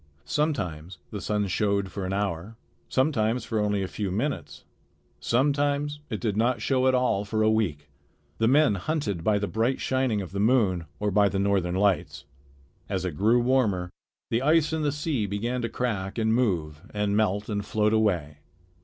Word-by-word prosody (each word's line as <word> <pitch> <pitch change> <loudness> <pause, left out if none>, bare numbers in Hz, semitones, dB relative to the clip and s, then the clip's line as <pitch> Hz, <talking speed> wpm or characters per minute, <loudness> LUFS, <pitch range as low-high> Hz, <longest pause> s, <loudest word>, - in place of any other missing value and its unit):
Sometimes 90 - -2
the 105 - -5
sun 105 -1 0
showed 100 0 0
for 95 -2 -4
an - - -3
hour, 100 +1 -2 0.3
sometimes 125 -4 +1
for 110 - -1
only 105 -1 0
a - - -2
few 100 +1 -3
minutes, 90 - -3 0.6
sometimes 145 +3 +1
it 110 - -3
did 110 -4 -1
not 120 +2 +1
show 130 +3 +1
at 130 - +4
all 125 -6 +1
for 110 +2 -1
a 110 - +4
week. 85 -10 -1 0.5
The 110 - +3
men 145 -1 +4
hunted 100 - -2
by 105 +1 +3
the 105 - -1
bright 115 +5 0
shining 130 -5 0
of 95 -3 -6
the 100 - -4
moon 105 -6 +2
or 105 0 0
by 100 +1 +4
the 95 - -2
northern 95 -3 +1
lights. 100 -1 0 0.6
As 95 -2 -2
it 85 -5 -3
grew 115 +8 +3
warmer 105 -9 +1 0.4
the 115 - +1
ice 155 +2 +3
in 160 - 0
the 145 -1 +1
sea 145 -7 -1
began 115 +6 -2
to 115 - -2
crack 105 -6 -3
and 110 -1 +2
move 85 -11 0
and 105 -1 0
melt 105 -1 +1
and 100 -2 -2
float 105 +1 +1
away. 90 -10 +1
105 Hz, 180 wpm, -26 LUFS, 95-125 Hz, 0.6 s, at